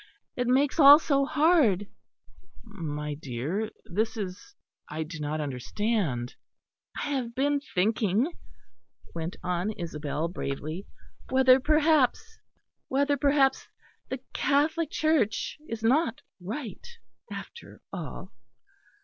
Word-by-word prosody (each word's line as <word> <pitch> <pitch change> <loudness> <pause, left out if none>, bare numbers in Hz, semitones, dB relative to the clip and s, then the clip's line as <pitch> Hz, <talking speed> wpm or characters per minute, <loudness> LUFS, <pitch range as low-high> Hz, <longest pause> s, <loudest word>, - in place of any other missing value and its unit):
It 245 -1 -1
makes 275 +5 +2
all 285 0 +11
so 280 -3 +1
hard." 290 - +3 0.8
"My 150 -9 -5
dear, 150 - -3 0.2
this 220 +6 -1
is 205 - -6 0.3
I 155 +1 -3
do 160 +1 -8
not 150 +1 -2
understand." 145 - -2 0.6
"I - - -3
have 245 -4 -2
been 285 +2 +1
thinking," 215 - +1 0.8
went 165 +1 -4
on 180 +3 -1
Isabel 155 -3 -3
bravely, 155 +2 -5 0.4
"whether 260 0 +6
perhaps 305 -1 +2 0.5
the 280 +2 +1 1.2
Catholic 305 +3 +1
Church 305 -8 0
is 225 -1 -5
not 250 0 +2 0.2
right 220 +6 -6 0.5
after 470 - -9
all." - - -7
220 Hz, 100 wpm, -28 LUFS, 165-280 Hz, 1.2 s, all